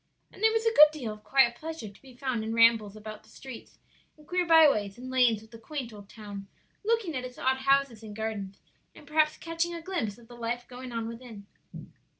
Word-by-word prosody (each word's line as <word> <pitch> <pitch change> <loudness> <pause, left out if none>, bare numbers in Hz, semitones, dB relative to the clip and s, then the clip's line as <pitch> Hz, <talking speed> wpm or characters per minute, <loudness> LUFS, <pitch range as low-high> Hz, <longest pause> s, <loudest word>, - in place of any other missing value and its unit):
And - - -14
there 445 0 +5
was 450 0 0
a 455 - +3
good 300 -7 +10
deal 250 -8 -5
of 210 0 -14
quiet 265 -3 +4
pleasure 320 -3 -6
to 200 - -15
be 260 -2 -15
found 250 -3 -2
in 225 +1 -3
rambles 230 -3 +5
about 215 0 -8
the - - -23
streets 260 -3 -11 0.4
and 300 - -18
queer 360 +2 0
byways 280 -12 +5
and 255 +1 -8
lanes 240 -4 +3
of 220 - -19
the 230 - -11
quaint 255 -1 -6
old 205 -1 -12
town, 205 -3 -9 0.4
looking 430 -7 0
at 255 - -2
its 250 0 -8
odd 260 0 +1
houses 275 -3 +2
and 215 -2 -9
gardens, 205 -3 -4 0.4
and - - -14
perhaps 305 +1 +2
catching 335 +1 -2
a - - -5
glimpse 325 - -3
of 235 -1 -17
the 240 - -13
life 240 +1 -3
going 250 0 -8
on 230 -1 -3
within. 230 -3 -9
245 Hz, 220 wpm, -29 LUFS, 220-300 Hz, 0.4 s, good